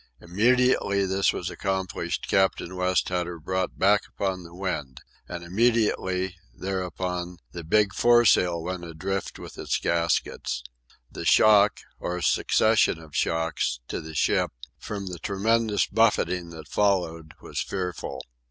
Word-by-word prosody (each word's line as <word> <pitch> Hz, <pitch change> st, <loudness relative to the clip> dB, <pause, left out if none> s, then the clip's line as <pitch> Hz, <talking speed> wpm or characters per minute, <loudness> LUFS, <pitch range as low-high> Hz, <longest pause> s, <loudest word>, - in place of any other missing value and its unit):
Immediately 105 Hz, +1 st, +2 dB
this 95 Hz, +1 st, +2 dB
was -, -, -4 dB
accomplished 95 Hz, -1 st, -3 dB
Captain 95 Hz, -1 st, +1 dB
West 90 Hz, 0 st, +1 dB
had 90 Hz, -1 st, -1 dB
her 85 Hz, -1 st, -7 dB
brought 95 Hz, +3 st, -2 dB
back 100 Hz, +2 st, +4 dB
upon 95 Hz, -2 st, -3 dB
the 85 Hz, 0 st, -12 dB
wind. 75 Hz, -9 st, -4 dB, 0.3 s
And 85 Hz, -1 st, -6 dB
immediately, 95 Hz, -3 st, +1 dB, 0.2 s
thereupon, 90 Hz, -1 st, -3 dB
the 85 Hz, -, -7 dB
big 105 Hz, +5 st, +2 dB
foresail 100 Hz, -8 st, +4 dB
went 90 Hz, 0 st, -4 dB
adrift 90 Hz, +4 st, -4 dB
from -, -, -9 dB
its -, -, -1 dB
gaskets. 85 Hz, -1 st, -1 dB, 0.5 s
The -, -, -6 dB
shock, 105 Hz, -1 st, +5 dB, 0.2 s
or 90 Hz, 0 st, -3 dB
succession 110 Hz, -5 st, +3 dB
of 80 Hz, -3 st, -13 dB
shocks, 80 Hz, -6 st, 0 dB
to -, -, -3 dB
the 80 Hz, 0 st, -9 dB
ship, -, -, +2 dB, 0.3 s
from 100 Hz, +4 st, -5 dB
the 90 Hz, -2 st, -6 dB
tremendous 105 Hz, +3 st, +1 dB
buffeting 90 Hz, -5 st, +1 dB
that 80 Hz, -3 st, -10 dB
followed, 85 Hz, -6 st, 0 dB
was -, -, -4 dB
fearful. 90 Hz, -3 st, -4 dB
95 Hz, 135 wpm, -26 LUFS, 85-100 Hz, 0.5 s, shock